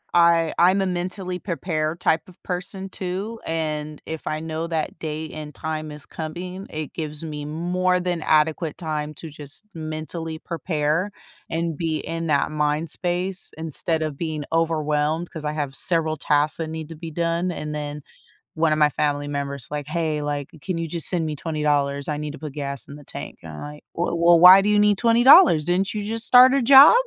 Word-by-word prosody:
I 170 -1 +4
I'm 185 +3 +5
a - - +1
mentally 180 0 -3
prepared 165 -2 -2
type 160 +1 +1
of 175 - -19
person 190 +1 -4
too, 195 +5 -4
and 155 -2 -3
if 160 -1 -6
I 155 - -1
know 160 +1 -4
that 160 -1 -3
day 155 0 -4
and 150 -1 -8
time 155 -1 -4
is 150 -1 -8
coming, 180 +4 -6
it 155 -2 -6
gives 155 -1 -5
me 150 -2 -5
more 180 +4 0
than 175 -2 -2
adequate 155 +1 +1
time 155 -3 -3
to 160 - -8
just 145 +4 -5
mentally 160 0 -5
prepare, 165 +3 -1 0.4
and 165 -1 -2
be 165 -2 -1
in 165 0 -4
that 150 0 +1
mind 150 +1 0
space 180 +1 -1
instead 160 +1 0
of 155 -3 -4
being 155 -2 -3
overwhelmed, 160 0 0
'cause 160 -2 -7
I 150 - 0
have 145 -3 -3
several 160 -2 +2
tasks 150 +1 +1
that 165 - -3
need 160 -1 -6
to 165 - -8
be 165 +1 -7
done, 170 +2 0
and 150 -2 -5
then, 150 0 -5 0.5
one 160 0 +2
of 155 - +2
my 150 -1 +5
family 145 0 -1
member's 140 -3 -4
like, 150 -1 -4
"Hey, 155 -1 -1
like, 145 -1 -3
can 185 -3 -3
you 165 - -2
just 165 0 -1
send 170 -3 0
me 155 -1 -3
$20, 145 -2 0
I 150 - -2
need 150 0 -5
to - - -8
put 150 -3 -7
gas 140 -4 -5
in 140 - -9
the 145 - -13
tank," - - -8
and 80 - -9
I'm 75 - -8
like, 150 0 -9
"W 170 0 -1
well, 170 0 +5
why 185 +3 +10
do 205 - 0
you 210 - +4
need 205 -1 +3
$20? 240 - +7
Didn't 180 +3 +1
you 210 - -2
just 225 +2 0
start 255 +1 +8
a 275 - +3
job?" 270 +4 +9
160 Hz, 200 wpm, -23 LUFS, 150-175 Hz, 0.5 s, why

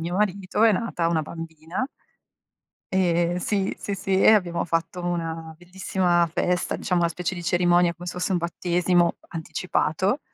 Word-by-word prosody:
mio 175 +3 -3
marito 200 0 0
è 225 - +6
nata 185 -5 -1
una 165 -2 +1
bambina 165 - -5 1.1
e 175 -2 +2
sì, 195 +1 0
sì, 200 - -3
sì, 190 0 0
e - - +7
abbiamo 175 -5 +1
fatto 165 +2 -2
una 165 -2 -3
bellissima 175 -1 0
festa, 180 +2 0
diciamo 180 -3 0
una 170 - +3
specie 180 +2 -3
di 175 - -6
cerimonia 175 0 +3
come 175 +1 -10
se - - -3
fosse 180 +2 -1
un - - +3
battesimo 175 0 +1
anticipato, 180 - -1
175 Hz, 155 wpm, -24 LUFS, 170-185 Hz, 1.1 s, e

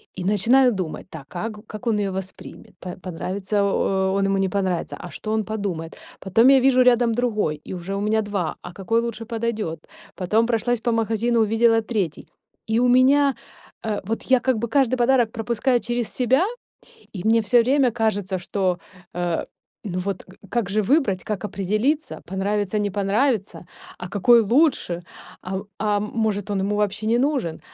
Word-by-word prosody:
И 185 - -5
начинаю 230 +7 +4
думать: 185 -6 -5
"Так, 155 -6 -10
как 210 +5 -6
как 215 +3 -9
он 225 -2 +2
её 200 -1 -1
воспримет, 190 0 -8
п 180 -1 -7
понравится 190 +3 -3
о 190 -1 +1
он 195 0 +1
ему 195 0 +1
не 190 -1 +1
понравится, 185 -3 -2
а 175 - -8
что 215 - -5
он 220 -1 0
подумает?". 195 -7 -4 0.2
Потом 225 +6 +3
я 270 0 +7
вижу 255 0 +4
рядом 240 -2 +4
другой, 215 -10 -1
и - - -7
уже 185 +2 -5
у 200 - -2
меня 215 +1 +1
два, 200 -5 -2
а 175 - -8
какой 225 +5 0
лучше 235 -1 -5
подойдёт? 225 -7 -3 0.4
Потом 210 +5 +1
прошлась 240 0 0
по 240 - 0
магазину, 225 +1 +1
увидела 225 +1 +3
третий, 210 -8 -3 0.4
и 220 +1 +1
у 250 - +3
меня, 270 +3 +4 0.5
э, 215 -2 -2
вот, 225 +3 -3
я 260 -1 +3
как 255 -1 +1
бы 235 +2 -2
каждый 255 0 +2
подарок 240 -2 +3
пропускаю 235 +3 0
через 240 -1 -2
себя, 260 +5 +2 0.7
и 185 - -4
мне 225 +1 +4
всё 235 +3 +4
время 265 0 +3
кажется, 210 -4 -1
что 185 0 -1 0.4
э 175 -1 -1 0.4
ну 185 -3 -3
вот 195 0 -4
г 190 - -16
как 235 -6 0
же 215 +2 +1
выбрать, 210 - +1
как 210 -1 -4
определиться, 215 - -1
понравится, 205 +2 -1
не 205 -1 -1
понравится, 200 -2 0 0.3
а 180 - -7
какой 230 +4 +5
лучше, 225 - +1 0.4
а, 190 +1 -4 0.2
а 210 0 +1
может 210 -1 -2
он 200 - 0
ему 200 +2 0
вообще 210 +1 -1
не 230 +2 +3
нужен. 260 - 0
215 Hz, 175 wpm, -23 LUFS, 195-235 Hz, 0.7 s, я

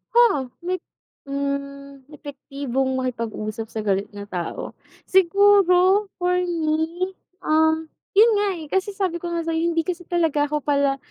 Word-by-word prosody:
Oo. 345 - +4 0.2
May, 370 +1 0 0.5
hmm, 280 0 -4
epektibong 275 -3 -3
makipag-usap 225 -3 -4
sa 220 - -5
galit 195 0 0
na 205 0 -7
tao. 180 -4 -5 0.3
Siguro 385 +1 +4
for 360 0 +1
me, 335 +1 -1 0.3
um, 315 +1 +3 0.3
yun 455 +3 +7
nga, 410 0 +2
eh, 320 - -7
kasi 380 +1 +1
sabi 375 -4 -2
ko 345 - -4
nga 335 -1 -2
sa'yo 325 0 0
hindi 330 -1 0
kasi 355 0 -3
talaga 315 -4 +1
ako 300 -1 -2
pala 280 -1 +2
315 Hz, 140 wpm, -23 LUFS, 275-360 Hz, 0.5 s, yun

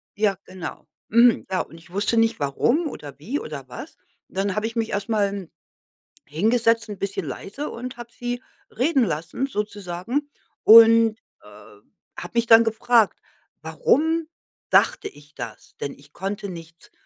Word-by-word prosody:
ja 205 -3 +1
genau, 185 -2 -8 0.2
mhm. 235 +1 +5
Ja, 185 - +1
und 165 - -10
ich 165 - -19
wusste 205 +4 0
nicht 225 -5 +2
warum 235 - +1
oder 145 - -10
wie 255 - -3
oder 140 -4 -7
was. 290 - -9 0.3
Und - - -14
dann 195 0 0
habe 215 +1 0
ich 230 - -8
mich 225 -1 0
erst 200 +2 -3
mal 210 -2 +2
n 195 -4 -7 0.8
hingesetzt, 225 +7 +1
'n 205 - -6
bisschen 200 0 -3
leise, 275 +10 -6
und 250 +1 -7
habe 240 0 -10
sie 245 +1 -5 0.3
reden 265 +3 +2
lassen, 170 - -3
sozusagen 210 +5 -3 0.3
und, 225 0 +8 0.3
äh, - - -16 0.7
habe - - -8
mich 235 0 +2
dann 225 0 +8
gefragt: 225 0 +2 0.4
„Warum 320 - +1 0.4
dachte - - +3
ich 145 +1 -19
das?“ - - -9
Denn 140 - -3
ich 140 +1 -19
konnte 200 +1 -4
nichts 165 -1 -11
215 Hz, 160 wpm, -23 LUFS, 185-240 Hz, 0.8 s, und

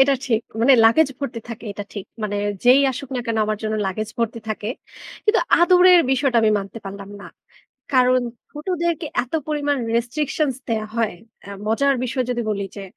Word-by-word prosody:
এটা 275 +1 +5
ঠিক। 225 -4 +1 0.2
মানে 255 +4 +6
লাগেজ 270 +7 +5
ভর্তি 260 -4 -4
থাকে, 230 0 -8
এটা 205 +1 -6
ঠিক। 200 -3 -7 0.2
মানে 205 -1 -2 0.3
যেই 255 +3 +7
আসুক 265 +1 -7
না - - -1
কেন 230 -1 -1
আমার 215 0 -1
জন্য 215 0 -1
লাগেজ 210 +3 -3
ভর্তি 230 0 -1
থাকে। 215 -1 -3 0.6
কিন্তু 425 +1 +3 0.2
আদরের 360 0 +7
বিষয়টা 265 -1 +2
আমি 220 - +4
মানতে 200 +3 -7
পারলাম 200 0 -8
না। - - -10 0.7
কারণ, 255 -1 +4 0.3
ছোটদেরকে 340 +1 -2 0.2
এত 250 - -24 0.2
পরিমাণ 290 -1 0 0.2
restrictions 270 +3 -1
দেয়া 220 -2 -1
হয়। 225 -2 +1 0.3
অ্যা 200 - -10 0.2
মজার 275 +6 +2
বিষয় 255 +1 -1
যদি 240 -1 -1
বলি, 200 -1 -2
যে 200 - -6
245 Hz, 175 wpm, -21 LUFS, 215-280 Hz, 0.7 s, যেই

